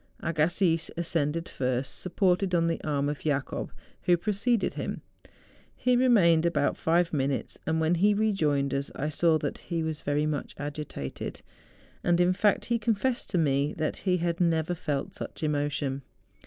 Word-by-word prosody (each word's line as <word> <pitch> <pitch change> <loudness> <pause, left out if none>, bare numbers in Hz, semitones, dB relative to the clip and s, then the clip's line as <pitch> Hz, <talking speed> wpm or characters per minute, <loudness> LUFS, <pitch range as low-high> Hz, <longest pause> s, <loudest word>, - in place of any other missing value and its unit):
Agassiz 165 +1 +1
ascended 165 -1 -1
first, 130 0 -2
supported 180 0 +1
on 165 -1 +3
the 165 0 -1
arm 145 -2 0
of 145 0 -2
Jacob 145 -3 -2 0.3
who 175 -1 +3
preceded 210 +4 0
him. - - -4 0.7
He 250 0 +2
remained 200 -11 +5
about 170 0 +1
five 170 +1 +1
minutes, 140 -2 -1
and 160 0 +1
when 160 +1 +2
he 205 +4 +3
re¬ 215 0 +2
joined 145 -6 +1
us 140 +1 -1
I 150 - -2
saw 160 +2 +3
that - - -4
he 165 -2 -3
was 160 -1 -3
very 145 +1 0
much 150 -2 -3
agitated; 145 - -6 0.6
and, 175 0 +3
in 180 +1 +4
fact, 205 +1 +2
he 235 0 0
confessed 235 +3 0
to 185 - 0
me 140 -2 +2
that 155 -1 -1
he 185 -2 +1
had 170 0 -1
never 165 0 +2
felt 145 -5 -3
such - - -7
emotion. 145 -2 -1
165 Hz, 165 wpm, -28 LUFS, 145-180 Hz, 0.7 s, remained